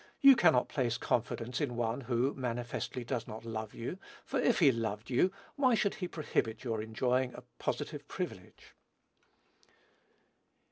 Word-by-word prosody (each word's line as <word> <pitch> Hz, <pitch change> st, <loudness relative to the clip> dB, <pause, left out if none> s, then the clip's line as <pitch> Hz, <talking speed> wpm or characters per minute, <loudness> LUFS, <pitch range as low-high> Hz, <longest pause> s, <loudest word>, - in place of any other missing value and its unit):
you 275 Hz, -1 st, +9 dB
cannot 160 Hz, -, +4 dB
place 120 Hz, -4 st, 0 dB
confidence 120 Hz, +1 st, -1 dB
in 130 Hz, -5 st, -1 dB
one 120 Hz, +2 st, -1 dB
who, 125 Hz, +2 st, +1 dB
manifestly, 120 Hz, 0 st, -3 dB
does 120 Hz, -1 st, -3 dB
not 110 Hz, +1 st, -8 dB
love 110 Hz, -2 st, -5 dB
you; 125 Hz, +11 st, -5 dB, 0.3 s
for, 270 Hz, -, -1 dB
if 245 Hz, -2 st, +3 dB
he 150 Hz, -6 st, +6 dB
loved 115 Hz, 0 st, -3 dB
you, 155 Hz, +9 st, +4 dB, 0.3 s
why 260 Hz, -4 st, +4 dB
should 200 Hz, -2 st, +1 dB
he 180 Hz, -, -4 dB
prohibit 135 Hz, -9 st, -1 dB
your 115 Hz, -4 st, -1 dB
enjoying 125 Hz, +3 st, 0 dB
a -, -, -9 dB, 0.2 s
positive -, -, -3 dB
privilege?" -, -, -6 dB
125 Hz, 145 wpm, -33 LUFS, 115-150 Hz, 0.3 s, you